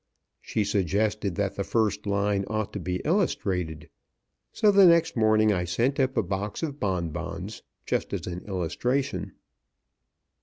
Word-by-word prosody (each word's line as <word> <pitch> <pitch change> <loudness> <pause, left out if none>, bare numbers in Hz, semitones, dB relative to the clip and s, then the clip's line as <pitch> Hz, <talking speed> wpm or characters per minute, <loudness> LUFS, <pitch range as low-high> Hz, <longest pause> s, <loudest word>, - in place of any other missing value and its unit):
She 110 - -1
suggested 100 0 0
that 100 0 -1
the 100 - -2
first 105 -1 0
line 100 0 +1
ought 110 -1 -2
to 100 - -3
be 90 0 -3
illustrated. 90 - 0 0.6
So 210 - +4
the 195 -2 +7
next 170 -1 +4
morning 110 -1 +4
I 90 -2 0
sent 120 +11 0
up 130 0 +1
a - - +3
box 100 - -3
of 145 -3 -3
bonbons, 90 -6 -3 0.2
just - - -1
as - - -3
an 90 -1 -4
illustration. 100 - -2
100 Hz, 145 wpm, -27 LUFS, 95-115 Hz, 0.6 s, the